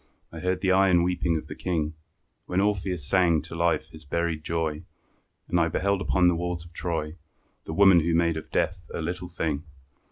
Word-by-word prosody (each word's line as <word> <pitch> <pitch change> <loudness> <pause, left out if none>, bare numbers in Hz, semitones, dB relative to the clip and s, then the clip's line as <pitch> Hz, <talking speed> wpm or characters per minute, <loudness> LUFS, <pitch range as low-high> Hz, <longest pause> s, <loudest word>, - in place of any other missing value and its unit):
I 80 - -8
heard 90 +2 -1
the 95 -1 +2
iron 95 -2 +4
weeping 85 -2 +1
of 80 - -6
the - - -7
King, 80 -4 -2 0.5
When 90 - 0
Orpheus 95 -5 0
sang 85 -3 +3
to 80 - -10
life 85 -2 0
his 80 -1 -12
buried 80 +1 -2
joy; 80 -2 -2 0.7
And 90 - +1
I 85 - +3
beheld 100 +2 0
upon 90 +1 +2
the 90 - +5
walls 85 0 -3
of 85 - -15
Troy 80 -2 -3 0.5
The 80 - -5
woman 95 -1 +7
who 85 +1 +1
made 85 -1 +2
of 80 0 -6
death 90 0 -1
a - - -3
little 90 +2 -4
thing. 80 -4 -2
85 Hz, 195 wpm, -26 LUFS, 80-90 Hz, 0.7 s, woman